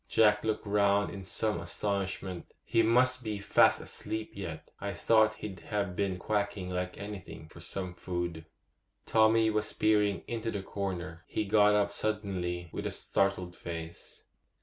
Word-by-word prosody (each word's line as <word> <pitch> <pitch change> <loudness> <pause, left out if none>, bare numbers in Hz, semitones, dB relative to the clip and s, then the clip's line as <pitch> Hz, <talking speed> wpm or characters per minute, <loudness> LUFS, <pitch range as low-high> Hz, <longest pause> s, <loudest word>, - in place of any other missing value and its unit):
Jack 105 -2 +4
looked 110 -1 -1
round 100 0 +3
in 100 -1 -7
some 105 +1 -1
astonishment. 95 0 -3
'He 115 - +3
must 125 +3 +3
be 110 -2 -2
fast 100 - +4
asleep 110 0 -4
yet; 85 -5 -6
I 100 0 -3
thought 110 -1 +4
he'd 95 -4 -7
have 100 -1 -2
been 95 -2 0
quacking 100 -1 -1
like 90 0 -3
anything 95 -6 -8
for 85 - -13
some 90 +1 -5
food.' 85 -2 -4 0.6
Tommy 110 0 +4
was 105 0 0
peering 105 -4 +2
into 115 -1 -2
the 100 -3 -3
corner. 90 -4 -4
He 105 - -1
got 105 0 +5
up 100 -1 +2
suddenly 95 -5 -2
with - - -3
a - - -3
startled 95 -2 0
face. 85 -1 -8
100 Hz, 150 wpm, -31 LUFS, 90-105 Hz, 0.6 s, got